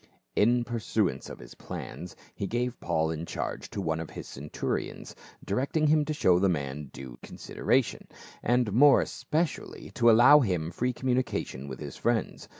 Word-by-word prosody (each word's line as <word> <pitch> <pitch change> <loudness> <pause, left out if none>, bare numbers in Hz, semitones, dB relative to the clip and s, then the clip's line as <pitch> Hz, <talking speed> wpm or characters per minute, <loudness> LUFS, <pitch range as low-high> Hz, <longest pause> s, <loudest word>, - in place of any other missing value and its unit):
In 120 +3 +3
pursuance 110 - -1
of - - -8
his - - -12
plans 85 +7 -8 0.2
he 100 - -4
gave 120 +2 -2
Paul 80 -2 0
in 80 +1 -5
charge - - -4
to - - -5
one 80 -4 -1
of 80 - -5
his - - -8
centurions, 70 +3 -4 0.3
directing 140 +9 0
him 150 0 +4
to 155 - -2
show 90 - +4
the 100 0 +3
man 70 -3 -3
due 65 -3 -10
consideration, - - -1 0.3
and 120 -3 +1
more 140 +5 +7
especially 160 0 -3
to 120 - +4
allow 120 +6 +8
him 90 - -1
free 125 +9 -1
communication 125 - -2
with 65 -2 -7
his - - -7
friends. - - -1
105 Hz, 160 wpm, -28 LUFS, 80-125 Hz, 0.3 s, allow